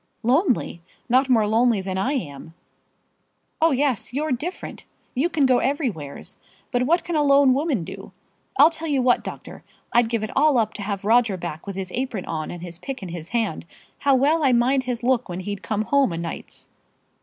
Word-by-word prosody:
"Lonely! 250 Hz, -, +1 dB, 0.3 s
not 260 Hz, +3 st, +3 dB
more 225 Hz, -4 st, +4 dB
lonely 225 Hz, +1 st, +3 dB
than 190 Hz, 0 st, -4 dB
I 220 Hz, +9 st, 0 dB
am." 160 Hz, -, -5 dB, 1.1 s
"Oh, 325 Hz, -, +5 dB
yes; 270 Hz, -6 st, 0 dB
you're 300 Hz, +4 st, -2 dB
different. 305 Hz, +9 st, -4 dB, 0.3 s
You 285 Hz, +8 st, +1 dB
can 300 Hz, -5 st, +2 dB
go 255 Hz, -2 st, +4 dB
everywheres. 235 Hz, -, -3 dB, 0.3 s
But 250 Hz, 0 st, +1 dB
what 340 Hz, +3 st, +3 dB
can 345 Hz, -, -3 dB
a 300 Hz, -, +3 dB
lone 280 Hz, -2 st, +5 dB
woman 275 Hz, -, 0 dB
do? -, -, -9 dB, 0.5 s
I'll 310 Hz, +3 st, +7 dB
tell 325 Hz, 0 st, -6 dB
you 285 Hz, -3 st, +1 dB
what, 245 Hz, -1 st, +3 dB
doctor; -, -, -8 dB, 0.3 s
I'd 240 Hz, -1 st, +4 dB
give 230 Hz, -2 st, -1 dB
it 215 Hz, -, -5 dB
all 295 Hz, -1 st, +4 dB
up 220 Hz, -2 st, +1 dB
to -, -, -7 dB
have 200 Hz, -1 st, -4 dB
Roger 225 Hz, -3 st, +3 dB
back 170 Hz, 0 st, -7 dB
with 200 Hz, -, -5 dB
his 190 Hz, -1 st, -5 dB
apron 240 Hz, -5 st, -3 dB
on 155 Hz, -1 st, -4 dB
and 175 Hz, -1 st, -7 dB
his 175 Hz, -1 st, -7 dB
pick 265 Hz, -2 st, -6 dB
in 185 Hz, -, -6 dB
his 170 Hz, -1 st, -7 dB
hand. 220 Hz, -7 st, -2 dB, 0.3 s
How 280 Hz, -1 st, +3 dB
well 295 Hz, +5 st, +3 dB
I 265 Hz, -3 st, +4 dB
mind 255 Hz, +2 st, +2 dB
his 245 Hz, -2 st, -3 dB
look 250 Hz, -3 st, +1 dB
when 180 Hz, +1 st, -4 dB
he'd 200 Hz, +1 st, -5 dB
come 215 Hz, 0 st, -1 dB
home 275 Hz, -1 st, +2 dB
o' -, -, -3 dB
nights." 165 Hz, 0 st, -7 dB
245 Hz, 200 wpm, -23 LUFS, 195-275 Hz, 1.1 s, I'll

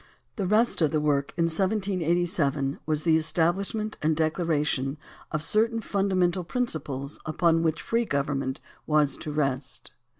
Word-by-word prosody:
The 195 Hz, -5 st, -2 dB
rest 215 Hz, 0 st, +2 dB
of 155 Hz, -, +4 dB
the 155 Hz, -, +1 dB
work 145 Hz, -2 st, +1 dB
in 170 Hz, -, +2 dB
1787 170 Hz, -6 st, 0 dB
was 155 Hz, -1 st, 0 dB
the 165 Hz, -2 st, +4 dB
establishment 190 Hz, +7 st, 0 dB
and 155 Hz, +1 st, +2 dB
declaration 155 Hz, -4 st, 0 dB, 0.3 s
of 150 Hz, -1 st, -2 dB
certain 225 Hz, +5 st, +2 dB
fundamental 190 Hz, -4 st, +1 dB
principles 155 Hz, -, -3 dB
upon 165 Hz, +1 st, +2 dB
which 160 Hz, -1 st, 0 dB
free 230 Hz, +1 st, +1 dB
government 140 Hz, -4 st, -1 dB, 0.3 s
was 150 Hz, -3 st, +3 dB
to 150 Hz, -, -6 dB
rest. 135 Hz, -3 st, -2 dB
160 Hz, 135 wpm, -27 LUFS, 150-190 Hz, 0.3 s, of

